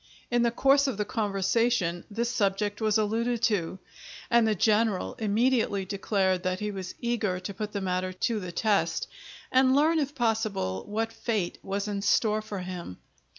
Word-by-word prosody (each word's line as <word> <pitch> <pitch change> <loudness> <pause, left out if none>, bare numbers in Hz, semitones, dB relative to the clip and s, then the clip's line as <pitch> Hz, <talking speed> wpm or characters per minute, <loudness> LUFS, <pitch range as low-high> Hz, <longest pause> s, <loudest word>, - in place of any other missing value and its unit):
In 240 0 +3
the 235 - +3
course 275 +4 +3
of 255 -7 -2
the 210 - -1
conversation 205 -3 0
this 235 +3 -1
subject 205 -1 0
was 215 -1 +3
alluded 225 +3 0
to, 190 -5 +1 0.5
and 235 -1 +5
the 215 - +2
general 215 0 +2
immediately 220 -2 +1
declared 190 -1 0
that 185 0 -1
he 210 0 -2
was 190 -2 -6
eager 230 -6 -1
to 200 +2 -5
put 210 +1 -5
the 200 - -3
matter 185 0 -1
to 215 +4 -1
the 180 -3 -6
test, 205 +2 +1 0.4
and 260 0 +4
learn, 315 +3 +4
if 290 0 -2
possible, 215 - -1
what 225 +2 -2
fate 215 -6 -2
was 200 +1 -3
in 200 -1 -2
store 215 +1 +2
for 210 -3 -6
him. 180 - -7
210 Hz, 170 wpm, -28 LUFS, 195-230 Hz, 0.5 s, and